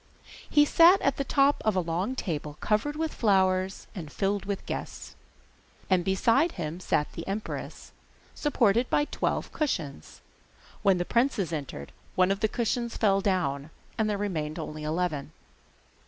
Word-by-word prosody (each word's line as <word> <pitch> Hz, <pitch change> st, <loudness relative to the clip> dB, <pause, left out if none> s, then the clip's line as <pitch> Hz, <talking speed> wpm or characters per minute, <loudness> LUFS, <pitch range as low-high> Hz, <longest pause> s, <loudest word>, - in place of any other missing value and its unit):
He 295 Hz, 0 st, +5 dB
sat 340 Hz, +5 st, +6 dB
at 275 Hz, -, +2 dB
the 275 Hz, -, 0 dB
top 280 Hz, +1 st, +3 dB
of 215 Hz, -2 st, +1 dB
a -, -, +3 dB
long 180 Hz, +8 st, -1 dB
table 150 Hz, -, -4 dB
covered 220 Hz, +8 st, 0 dB
with 320 Hz, 0 st, -2 dB
flowers 190 Hz, -3 st, +1 dB
and 165 Hz, -8 st, -7 dB
filled 200 Hz, 0 st, -1 dB
with 200 Hz, -1 st, -4 dB
guests. -, -, -6 dB, 0.8 s
And 180 Hz, -2 st, +4 dB
beside 230 Hz, -, +2 dB
him 165 Hz, -1 st, -5 dB
sat 150 Hz, -4 st, 0 dB
the 165 Hz, -, -7 dB
empress, 205 Hz, +2 st, -5 dB, 0.4 s
supported 240 Hz, -5 st, +2 dB
by 295 Hz, -, +2 dB
twelve -, -, -2 dB
cushions. 140 Hz, -, -3 dB, 0.6 s
When 195 Hz, -2 st, +4 dB
the 175 Hz, -, -1 dB
princes 235 Hz, -, +1 dB
entered 135 Hz, -, -5 dB, 0.2 s
one 185 Hz, +1 st, +4 dB
of 195 Hz, -, 0 dB
the 220 Hz, -, +2 dB
cushions 235 Hz, +1 st, -2 dB
fell 195 Hz, -3 st, +3 dB
down, 155 Hz, -7 st, -1 dB, 0.3 s
and 220 Hz, -1 st, 0 dB
there 205 Hz, -, 0 dB
remained 165 Hz, -6 st, -3 dB
only 155 Hz, -1 st, -6 dB
eleven. 155 Hz, -2 st, -2 dB
195 Hz, 155 wpm, -28 LUFS, 165-235 Hz, 0.8 s, sat